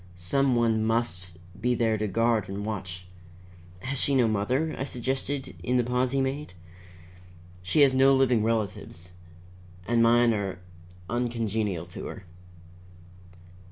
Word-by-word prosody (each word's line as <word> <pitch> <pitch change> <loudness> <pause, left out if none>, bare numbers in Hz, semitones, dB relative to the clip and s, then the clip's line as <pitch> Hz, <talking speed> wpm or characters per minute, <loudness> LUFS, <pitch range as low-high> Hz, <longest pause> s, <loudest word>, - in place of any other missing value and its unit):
Some 130 +10 +1
one 115 -2 +2
must 95 -6 -1 0.2
be 125 +2 +2
there 115 -1 +1
to 110 0 -1
guard 115 +1 +1
and 100 +1 -4
watch 90 -4 -5 0.4
" 90 0 -21
"Has 135 0 -2
she 140 - +3
no 125 -3 +4
mother?" 125 +9 0
I - - -3
suggested 135 +1 -3
in 125 0 +1
the 125 - +3
pause 125 +1 0
he 135 0 +1
made. 135 -5 -3 1.1
"She 90 +12 +2
has 140 -2 +6
no 135 +1 +5
living 125 -4 +3
relatives, 105 -6 -2 0.8
and 120 0 +3
mine 120 0 +5
are 100 -4 -3 0.5
uncongenial 110 -6 -1
to 85 - -8
her." 95 - -8
115 Hz, 140 wpm, -27 LUFS, 100-125 Hz, 1.1 s, has